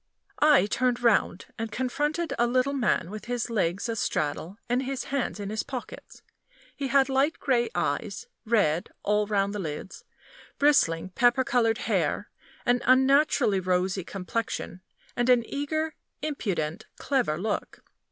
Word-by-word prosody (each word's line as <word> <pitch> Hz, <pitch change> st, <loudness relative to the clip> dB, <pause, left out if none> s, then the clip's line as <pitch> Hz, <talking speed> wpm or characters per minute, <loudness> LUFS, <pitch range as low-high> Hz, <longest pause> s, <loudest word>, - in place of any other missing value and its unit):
I 295 Hz, -6 st, +6 dB
turned 245 Hz, +3 st, 0 dB
round, 210 Hz, -5 st, +2 dB
and 225 Hz, -1 st, -3 dB
confronted 295 Hz, +7 st, -1 dB
a 240 Hz, -, +4 dB
little 255 Hz, +3 st, +1 dB
man 235 Hz, -9 st, 0 dB
with 215 Hz, 0 st, -7 dB
his 240 Hz, -1 st, -2 dB
legs 190 Hz, -1 st, 0 dB
astraddle, 185 Hz, -5 st, -2 dB
and 245 Hz, +2 st, +1 dB
his 265 Hz, -1 st, -3 dB
hands 275 Hz, -6 st, -2 dB
in 200 Hz, 0 st, -4 dB
his 215 Hz, -, -1 dB
pockets. 255 Hz, -3 st, -8 dB, 0.5 s
He 280 Hz, -, -3 dB
had 270 Hz, 0 st, +4 dB
light 275 Hz, +4 st, +1 dB
gray 240 Hz, -4 st, +1 dB
eyes, 455 Hz, -, -2 dB, 0.2 s
red 205 Hz, -8 st, +1 dB
all 210 Hz, 0 st, +1 dB
round 200 Hz, -1 st, +1 dB
the 210 Hz, -, -3 dB
lids, 155 Hz, +1 st, -6 dB, 0.5 s
bristling 185 Hz, -, +3 dB
pepper 245 Hz, +6 st, +3 dB
colored 230 Hz, -3 st, +2 dB
hair, -, -, -1 dB, 0.3 s
an 245 Hz, 0 st, +2 dB
unnaturally 265 Hz, -4 st, +4 dB
rosy 185 Hz, +1 st, 0 dB
complexion, 190 Hz, 0 st, -4 dB, 0.3 s
and 240 Hz, +1 st, +1 dB
an 245 Hz, -2 st, +5 dB
eager, 310 Hz, +2 st, -2 dB, 0.3 s
impudent, 195 Hz, -, -2 dB
clever 250 Hz, -, 0 dB
look. 205 Hz, +4 st, -3 dB
235 Hz, 140 wpm, -27 LUFS, 200-270 Hz, 0.5 s, I